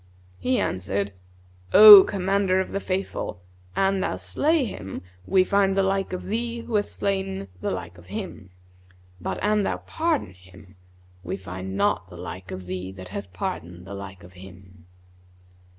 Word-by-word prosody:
He 255 -1 +1
answered, 100 +2 -2 0.6
'O 205 -1 +12
Commander 195 -1 +1
of 190 - -2
the 195 - -1
Faithful, 190 - -3 0.4
an 195 0 +2
thou 185 - -1
slay 265 - +1
him, 95 - -7 0.2
we 190 -1 +4
find 195 0 +2
the 195 - +4
like 195 0 0
of 185 - -4
thee 235 +3 -2
who 230 - -8
hath 205 -1 +1
slain 190 - -2
the - - -1
like 90 -1 -6
of 85 - -17
him; 95 0 -7 0.7
but - - -3
an 210 0 +3
thou - - -1
pardon 320 - -2
him, 95 +1 -17 0.5
we 90 +2 -4
find 95 0 -6
not - - +1
the - - -11
like 95 +1 -8
of 95 0 -7
thee 90 +1 -5
that 95 -1 -10
hath 100 -1 -7
pardoned 90 0 -5
the 95 - -8
like 95 -2 -9
of 90 +1 -14
him.'" 95 -1 -15
100 Hz, 165 wpm, -25 LUFS, -, 0.7 s, O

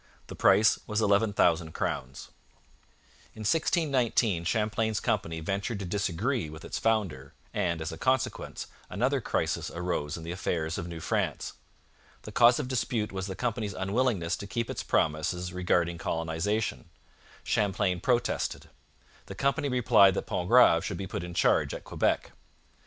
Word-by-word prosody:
The - - -9
price 105 -1 +4
was 105 0 0
11,000 100 -6 +2
crowns. 65 +1 -4 1.1
In 110 - -9
1619 125 - +1
Champlain's 110 +2 0
company 80 0 -1
ventured 100 +6 -2
to 100 - -5
disagree 100 - -1
with 80 +1 -10
its - - -4
founder, 95 -12 -1 0.2
and, 85 -1 0
as 80 - -4
a 80 - -8
consequence, 130 0 -1 0.2
another 130 +8 0
crisis - - -1
arose 85 -4 -3
in 85 - -8
the 85 - -5
affairs 85 -3 -2
of 85 - -5
New 85 -2 -7
France. - - -1 0.7
The - - -8
cause 120 0 +6
of 140 - -2
dispute 120 -4 -1
was 95 0 -4
the 95 - -5
company's 105 -1 -2
unwillingness 95 -3 0
to 100 - -7
keep 115 +3 -2
its - - -4
promises 90 +4 0
regarding 85 -2 0
colonization. 80 - -2 0.5
Champlain 95 -3 0
protested. 120 +3 -1 0.6
The - - -7
company 140 +1 0
replied 115 -6 +5
that - - -2
Pontgrave - - +4
should - - -3
be 95 - -4
put 85 - -5
in 90 0 -7
charge - - +2
at - - -8
Quebec. - - 0
100 Hz, 145 wpm, -28 LUFS, 85-115 Hz, 1.1 s, cause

